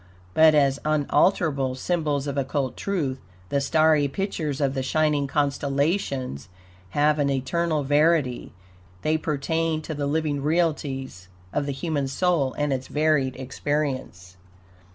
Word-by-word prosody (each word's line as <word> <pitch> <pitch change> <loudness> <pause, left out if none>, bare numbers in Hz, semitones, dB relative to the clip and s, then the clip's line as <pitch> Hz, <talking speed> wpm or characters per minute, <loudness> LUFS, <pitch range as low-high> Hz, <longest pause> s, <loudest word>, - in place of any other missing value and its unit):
But 155 +5 +6
as 140 -2 +3
unalterable 150 -2 +1
symbols 150 -1 -1
of 140 -1 -3
occult 135 -1 -1
truth, 150 -10 -2 0.3
the 140 - +1
starry 155 0 +3
pictures 155 -3 -3
of 140 -2 +1
the 135 - -2
shining 150 +1 +1
constellations 140 - -1 0.5
have 150 +1 +3
an 140 -1 +2
eternal 150 +4 0
verity. 145 -2 +2 0.5
They 155 - +2
pertain 160 +2 -1
to 160 - -5
the 145 -1 -2
living 150 -1 -1
realities 140 - -1 0.3
of 145 - -1
the - - -1
human 145 -1 -2
soul 140 -2 +1
and 145 -1 0
its 130 0 -4
varied 150 -4 +1
experience. 130 -9 -3
145 Hz, 130 wpm, -25 LUFS, 135-155 Hz, 0.5 s, But